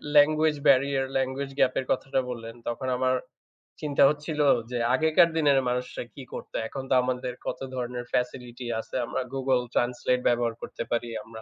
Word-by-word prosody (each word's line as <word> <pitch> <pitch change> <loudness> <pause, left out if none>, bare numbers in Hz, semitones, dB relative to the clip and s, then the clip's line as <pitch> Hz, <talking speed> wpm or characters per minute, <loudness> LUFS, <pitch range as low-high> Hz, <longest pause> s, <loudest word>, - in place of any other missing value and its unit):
language 155 +1 +5
barrier, 135 0 +4
language 135 +1 -2
gap 130 - +4
এর 130 - -3
কথাটা 135 +1 0
বললেন 115 -2 -6
তখন 125 +3 -3
আমার 130 0 +2 0.7
চিন্তা 145 -2 +3
হচ্ছিল, 150 +1 -3 0.3
যে 125 - -1 0.2
আগেকার 160 +4 +5
দিনের 145 -3 +4
মানুষরা 125 0 -3
কী 140 - -8
করতো। - - -8
এখন 135 +3 -6
তো - - +3
আমাদের 125 0 -2
কত - - -3 0.2
ধরনের 125 -1 -4
facility 125 0 -2
আছে। - - -8
আমরা 115 - -2
Google 130 -2 +1
Translate 125 +1 +1
ব্যবহার 120 -1 +2
করতে - - -5
পারি, 120 0 0
আমরা 110 0 -11
130 Hz, 165 wpm, -27 LUFS, 125-140 Hz, 0.7 s, language